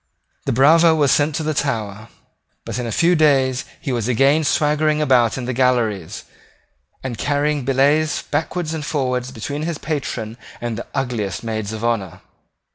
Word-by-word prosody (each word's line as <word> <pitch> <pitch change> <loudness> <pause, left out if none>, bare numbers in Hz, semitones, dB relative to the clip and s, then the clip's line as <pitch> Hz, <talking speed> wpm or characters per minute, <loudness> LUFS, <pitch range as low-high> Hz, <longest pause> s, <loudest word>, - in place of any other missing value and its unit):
The - - +2
bravo 160 +6 +5
was 145 -4 +3
sent 150 0 +2
to 160 - -2
the 155 0 -1
Tower: 110 -7 -2 0.6
but - - -4
in 120 - -3
a - - -3
few 170 +9 +3
days 135 -5 +2
he 145 - -4
was 120 -3 -1
again 135 +5 +3
swaggering 150 +1 +1
about 130 -6 +3
the 125 -1 -3
galleries, 120 -8 0 0.8
and 120 -4 -5
carrying 145 -1 0
billets 145 +4 +2
backward 165 0 -2
and 160 -2 -4
forward 130 -4 -2
between 145 +2 -5
his 165 0 -3
patron 125 -8 -4 0.2
and 120 -1 -3
the 115 - -7
ugliest 115 -9 -2
maids 110 -2 -3
of 110 0 -6
honour. 105 -7 -2
135 Hz, 160 wpm, -20 LUFS, 120-150 Hz, 0.8 s, bravo